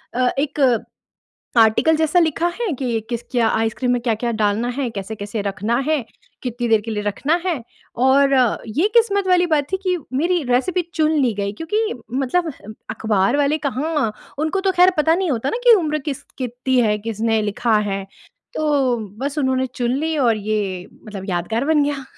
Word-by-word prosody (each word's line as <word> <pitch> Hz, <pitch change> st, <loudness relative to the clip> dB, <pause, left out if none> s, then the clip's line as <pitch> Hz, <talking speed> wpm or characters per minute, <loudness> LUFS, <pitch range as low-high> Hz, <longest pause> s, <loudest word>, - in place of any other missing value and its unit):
अ, 250 Hz, 0 st, +2 dB
एक 290 Hz, 0 st, -2 dB, 1.0 s
आर्टिकल 225 Hz, +9 st, +4 dB
जैसा 315 Hz, +2 st, +2 dB
लिखा 330 Hz, +1 st, +1 dB
है 430 Hz, -9 st, 0 dB
कि 240 Hz, -4 st, -1 dB
किस 235 Hz, 0 st, -2 dB
क्या 235 Hz, -3 st, +3 dB
आइसक्रीम 225 Hz, +3 st, 0 dB
में 245 Hz, -, +1 dB
क्या-क्या 235 Hz, 0 st, -1 dB
डालना 215 Hz, +2 st, 0 dB
है? 255 Hz, 0 st, -2 dB
कैसे-कैसे 205 Hz, +1 st, -5 dB
रखना 205 Hz, +4 st, -1 dB
है? 305 Hz, -6 st, +1 dB, 0.4 s
कितनी 245 Hz, -1 st, -3 dB
देर 220 Hz, -2 st, +4 dB
के 225 Hz, +2 st, -7 dB
लिए 210 Hz, -1 st, -2 dB
रखना 255 Hz, +10 st, 0 dB
है? 350 Hz, -, +2 dB, 0.4 s
और 270 Hz, +2 st, +4 dB, 0.4 s
ये 375 Hz, +7 st, +3 dB
किस्मत 405 Hz, -4 st, +3 dB
वाली 360 Hz, -1 st, +4 dB
बात 300 Hz, -4 st, +1 dB
थी -, -, +3 dB
कि 365 Hz, -1 st, +1 dB, 0.2 s
मेरी 345 Hz, +2 st, +1 dB
रेसिपी 350 Hz, +9 st, +2 dB
चुन 310 Hz, -1 st, +2 dB
ली 245 Hz, -4 st, +2 dB
गई 200 Hz, 0 st, -2 dB
क्योंकि 425 Hz, +7 st, -1 dB, 0.2 s
मतलब 295 Hz, +5 st, 0 dB, 0.4 s
अख़बार 215 Hz, +2 st, +1 dB
वाले 290 Hz, +2 st, +2 dB
कहाँ, 290 Hz, -4 st, -1 dB, 0.3 s
उनको 315 Hz, +5 st, 0 dB
तो 385 Hz, -1 st, +1 dB
ख़ैर 360 Hz, +1 st, +6 dB
पता 320 Hz, +2 st, +3 dB
नहीं 365 Hz, -3 st, 0 dB
होता 250 Hz, +1 st, -1 dB
ना 470 Hz, -, -2 dB
कि 480 Hz, -, +8 dB
उम्र 305 Hz, -4 st, 0 dB
किस 280 Hz, -2 st, -5 dB, 0.2 s
कितनी 255 Hz, +1 st, -1 dB
है? 210 Hz, -2 st, +2 dB
किसने 225 Hz, +1 st, -1 dB
लिखा 215 Hz, +1 st, +1 dB
है? 195 Hz, 0 st, -3 dB, 0.5 s
तो 280 Hz, -5 st, +1 dB, 0.3 s
बस 285 Hz, +2 st, -2 dB
उन्होंने 260 Hz, -1 st, +1 dB
चुन 245 Hz, +1 st, 0 dB
ली 320 Hz, +1 st, -1 dB
और 235 Hz, -5 st, +3 dB
ये 200 Hz, -3 st, -2 dB, 0.2 s
मतलब 200 Hz, -3 st, -7 dB
यादगार 220 Hz, +8 st, -1 dB
बन 310 Hz, -2 st, +3 dB
गया। 280 Hz, -2 st, -3 dB
260 Hz, 180 wpm, -20 LUFS, 225-315 Hz, 1.0 s, कि